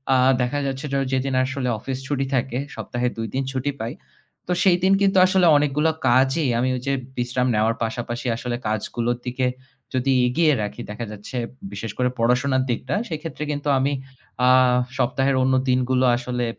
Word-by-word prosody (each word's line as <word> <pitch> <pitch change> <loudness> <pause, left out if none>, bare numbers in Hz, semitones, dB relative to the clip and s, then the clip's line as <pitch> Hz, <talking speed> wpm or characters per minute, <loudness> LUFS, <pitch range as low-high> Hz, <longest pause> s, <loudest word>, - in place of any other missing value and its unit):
আ - - +5 0.2
দেখা 125 +4 0
যাচ্ছে 135 +2 -4
যে - - 0
ওই 135 - -2
যেদিন 135 +1 0
আসলে 130 -1 -2
অফিস 130 +4 -4
ছুটি 135 -1 -1
থাকে, 125 0 -1 0.2
সপ্তাহে 120 +2 -2
২ 115 0 -3
দিন 135 +1 0
ছুটি 135 +2 -1
পাই। 115 +3 -3 0.5
তো - - -2
সেই 180 -3 +5
দিন 190 +1 +5
কিন্তু 195 -1 +3
আসলে 185 -1 +3
অনেকগুলা 150 +2 +2 0.2
কাজই 130 +5 +3
আমি 130 +2 +1
ওই 125 - -4
যে 140 - +2 0.2
বিশ্রাম 125 +1 0
নেওয়ার 110 +2 +2
পাশাপাশি 120 +2 -3
আসলে 120 +1 -3
কাজগুলোর 115 +3 -1
দিকে 125 +1 -1 0.5
যদি 130 +1 +1 0.2
এগিয়ে 155 +5 +3
রাখি, 105 - -5
দেখা 105 +3 -5
যাচ্ছে 105 +5 -7 0.3
বিশেষ 115 - -5
করে 125 0 +2
পড়াশোনার 130 +3 +2
দিকটা, 125 +5 -2
সেক্ষেত্রে 160 -3 -5
কিন্তু 145 0 -4
আমি 135 +2 +1 0.6
আ - - +7 0.5
সপ্তাহের 135 +1 +1
অন্য 130 0 +2 0.2
দিনগুলো 125 0 +2
আসলে 125 0 -2
130 Hz, 175 wpm, -23 LUFS, 120-140 Hz, 0.6 s, আ